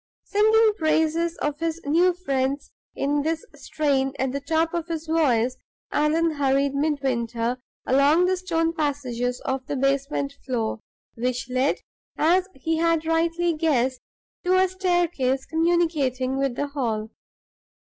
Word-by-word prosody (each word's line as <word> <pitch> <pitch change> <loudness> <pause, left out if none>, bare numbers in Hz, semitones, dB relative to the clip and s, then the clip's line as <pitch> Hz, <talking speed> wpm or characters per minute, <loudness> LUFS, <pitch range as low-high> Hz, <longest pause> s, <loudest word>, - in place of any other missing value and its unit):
Singing 420 +2 +2
the 445 -1 +5
praises 320 +1 +1
of 295 0 -1
his 330 0 -2
new 345 +5 +3
friends 275 -5 -2 0.2
in 290 +1 0
this 320 +4 -2
strain 270 -3 -1
at 265 -1 0
the 280 - -2
top 325 +3 0
of 340 -1 -2
his 330 -1 -4
voice, 260 -7 +2 0.3
Allan 320 +2 +2
hurried 275 -1 +1
Midwinter 255 -5 -1 0.3
along 285 +7 +4
the 375 +1 +2
stone 330 -3 -1
passages 255 -6 -2
on 265 0 -1
the - - -2
basement 275 +1 0
floor, 230 -4 -2 0.3
which 250 +1 -3
led, 255 +2 +1 0.4
as 360 +4 +3
he 320 +4 -1
had 330 -1 +1
rightly 335 +1 +1
guessed, 265 -6 +1 0.4
to 365 0 +3
a 375 0 +4
staircase 350 -8 0
communicating 320 -6 +1
with 270 -2 0
the 285 +2 -2
hall. 225 -6 -2
295 Hz, 135 wpm, -24 LUFS, 265-330 Hz, 0.4 s, the